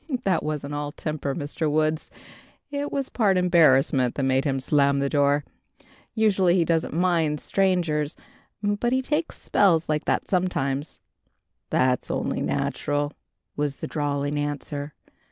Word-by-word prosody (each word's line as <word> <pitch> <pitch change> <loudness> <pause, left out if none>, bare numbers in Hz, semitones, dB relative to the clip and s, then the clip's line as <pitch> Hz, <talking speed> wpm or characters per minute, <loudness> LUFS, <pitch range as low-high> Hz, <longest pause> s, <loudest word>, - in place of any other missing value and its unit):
"That 185 -4 +2
wasn't 150 -1 -4
all 145 0 -3
temper, 150 -3 -3
Mr. 150 +1 -2
Woods. 155 +1 0 0.6
It 285 0 -3
was 275 -2 -1
part 200 -5 +2
embarrassment 135 -8 +4
that 140 - -1
made 135 +1 +2
him 135 -2 0
slam 140 +1 +2
the 140 0 0
door. 145 0 +2 0.7
Usually 195 -5 +3
he 175 -3 +3
doesn't 165 -2 0
mind 165 -4 +1
strangers, 170 -6 0 0.5
but 205 +4 0
he 260 0 +1
takes 300 +4 -2
spells 170 -5 +3
like 150 -1 0
that - - 0
sometimes." 150 -6 -1 0.7
"That's 125 -1 +1
only - - -2
natural," 145 0 -1 0.4
was 145 -1 -2
the - - -5
drawling 145 -1 -2
answer. 145 0 -4
150 Hz, 135 wpm, -25 LUFS, 145-180 Hz, 0.7 s, embarrassment